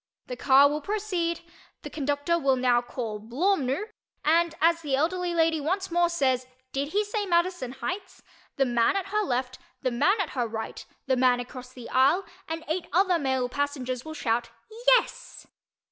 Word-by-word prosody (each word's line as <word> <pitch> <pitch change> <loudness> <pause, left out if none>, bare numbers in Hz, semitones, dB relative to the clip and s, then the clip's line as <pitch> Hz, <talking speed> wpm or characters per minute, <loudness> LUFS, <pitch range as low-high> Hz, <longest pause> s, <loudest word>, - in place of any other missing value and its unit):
The 250 - -6
car 270 +2 +6
will 300 +1 -2
proceed, 360 -3 -2 0.4
the - - -6
conductor 290 +3 0
will 270 -3 +3
now 250 -1 +3
call 235 -3 -5
"Blawmnoo!" 275 - 0 0.4
and 330 +1 +3
as 335 +1 +3
the 285 -4 0
elderly 345 +4 0
lady 325 -2 +2
once 375 +5 -2
more 345 0 +3
says 260 -6 +1 0.2
"Did 275 +1 -2
he 410 +7 0
say 415 -1 -2
Madison 345 -7 0
Heights?" 365 +10 -6 0.3
the 270 - +2
man 240 +5 +2
at 390 0 -2
her 425 +1 +1
left, 255 -7 -2 0.2
the 255 - +1
man 300 - +2
at 370 -6 -1
her 245 -3 -1
right, 220 0 -6 0.2
the 265 - +2
man 250 -1 +3
across 250 +1 -8
the 245 -2 -10
aisle 280 +9 +4 0.2
and 325 0 -4
eight 330 +3 -2
other 360 +1 +3
male 265 -3 0
passengers 255 -2 -3
will 315 0 -8
shout 235 -3 -1 0.5
"YES!" - - -6
285 Hz, 175 wpm, -27 LUFS, 255-345 Hz, 0.5 s, car